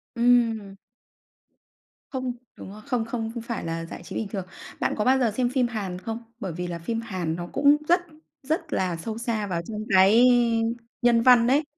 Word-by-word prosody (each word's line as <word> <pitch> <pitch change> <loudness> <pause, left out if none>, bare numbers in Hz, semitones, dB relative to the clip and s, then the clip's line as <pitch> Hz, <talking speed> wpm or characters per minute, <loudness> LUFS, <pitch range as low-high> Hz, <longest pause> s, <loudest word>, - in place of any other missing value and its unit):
Ừm. 230 -4 +2 1.4
Không, 255 -2 -2 0.2
đúng - - -10
rồi, 215 - -11
không 245 -5 0
không 225 -1 -3
không 235 - -5
ph - - -13
phải 235 -6 -4
là 165 0 -3
giải 170 - -9
trí - - -9
bình 220 - -2
thường. 195 -2 -5 0.3
Bạn - - 0
có 210 - 0
bao 265 +1 +4
giờ 240 -4 +2
xem 245 +3 0
phim 255 -1 +1
Hàn 200 -6 -4
không? 225 +4 -5 0.2
Bởi 190 -7 -4
vì 180 +1 -4
là 170 -1 -5
phim 225 +7 -3
Hàn 180 -7 -3
nó 175 0 -5
cũng 285 +1 +5
rất 350 +2 +4 0.4
rất 310 +5 -2
là 185 -2 0
sâu 220 +7 -5
xa 230 -3 -2
vào 170 -3 -2
trong 210 +5 -7 0.2
cái 200 +6 +6 0.8
nhân 240 -1 +4
văn 240 -1 +6
đấy. 280 +5 +3
225 Hz, 205 wpm, -25 LUFS, 190-245 Hz, 1.4 s, cái